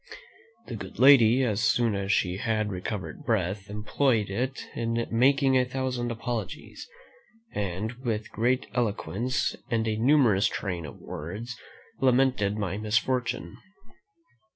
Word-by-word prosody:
The - - -6
good - - -8
lady, 130 -2 +7
as 110 -4 0
soon 120 -3 +2
as 100 0 -1
she 90 -2 +1
had 110 -1 -1
recovered 95 +8 -5
breath, 100 -4 -1
employed 105 +1 0
it 125 +6 -3
in 115 0 -1
making 135 +3 +4
a 130 - +5
thousand 125 -1 -2
apologies, 115 - -5 0.6
and, 100 +2 -2
with 110 -3 -2
great 125 +4 +1
eloquence, 120 +1 -1
and 115 -2 0
a 110 -1 0
numerous 120 -5 +4
train 90 -5 -4
of - - -11
words, 105 +11 -7 0.4
lamented 125 -5 +2
my 100 -1 -2
misfortune. 115 -3 -1
115 Hz, 125 wpm, -27 LUFS, 100-125 Hz, 0.6 s, lady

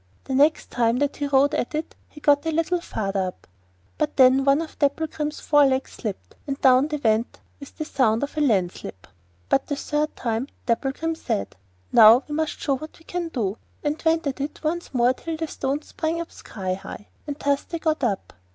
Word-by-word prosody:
The 265 - -5
next 290 +4 +3
time 235 0 +2
that 285 +1 0
he 290 - -1
rode 280 +1 +3
at 245 - -1
it 310 - -3 0.2
he 295 - -13
got 290 +1 +3
a - - +1
little 330 +2 0
farther 195 - -2
up, 180 - -9 0.5
but - - -1
then 260 +1 +6
one 275 +1 +4
of 320 - -12
Dapplegrim's 300 +1 -1
fore 290 -2 +5
legs 260 0 -1
slipped, 210 -4 -6
and 275 -1 -3
down 260 +2 +5
they 305 -1 -2
went 225 -3 0 0.2
with 280 - -12
the 310 - -3
sound 230 -5 +1
of 285 - -4
a 305 - 0
landslip. 185 - -1 0.4
But 270 - +1
the 285 - -1
third 300 +2 -2
time 230 +2 -2 0.2
Dapplegrim 270 +7 0
said: 100 - -3 0.4
'Now 230 +3 +8
we 295 - -6
must 315 0 -2
show 275 -2 0
what 310 +3 -10
we 325 - -21
can 355 -1 -3
do,' 225 -9 -2 0.2
and 295 +1 -1
went 325 0 +2
at 275 -1 -2
it 290 +3 -5
once 340 +3 -2
more 245 -1 +3
till 325 +4 -5
the 325 - -2
stones 285 +1 -3
sprang 325 +1 -2
up 335 - -5
sky 185 -3 -5
high, 195 +2 -9 0.2
and 290 -1 -4
thus 280 -1 +1
they 335 - -5
got 315 -3 -1
up. 205 -6 -1
280 Hz, 205 wpm, -24 LUFS, 245-310 Hz, 0.5 s, Now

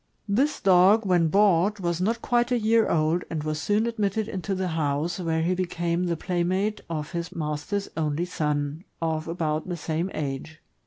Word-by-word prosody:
This 260 +9 +1
dog, 195 +4 +5
when 175 -3 +3
bought, 200 +2 +3
was 170 -1 -1
not 230 +4 0
quite 240 0 +1
a 245 - +3
year 225 0 +3
old, 160 +2 +2
and 155 -2 -3
was 155 0 -2
soon 210 +2 +1
admitted 215 -2 -1
into 195 -2 -3
the 185 -1 -1
house, 160 +2 -1
where 160 -2 0
he 175 +2 +1
became 175 -1 -1
the 170 -2 -1
playmate 185 +5 -1
of 155 -1 -4
his 170 -1 -4
master's 155 +6 -2
only 155 +1 -1
son, 150 -2 -2 0.2
of 160 -1 -2
about 160 -1 -2
the 175 - -2
same 160 +3 -2
age. 150 +2 -4
175 Hz, 175 wpm, -26 LUFS, 160-200 Hz, 0.2 s, dog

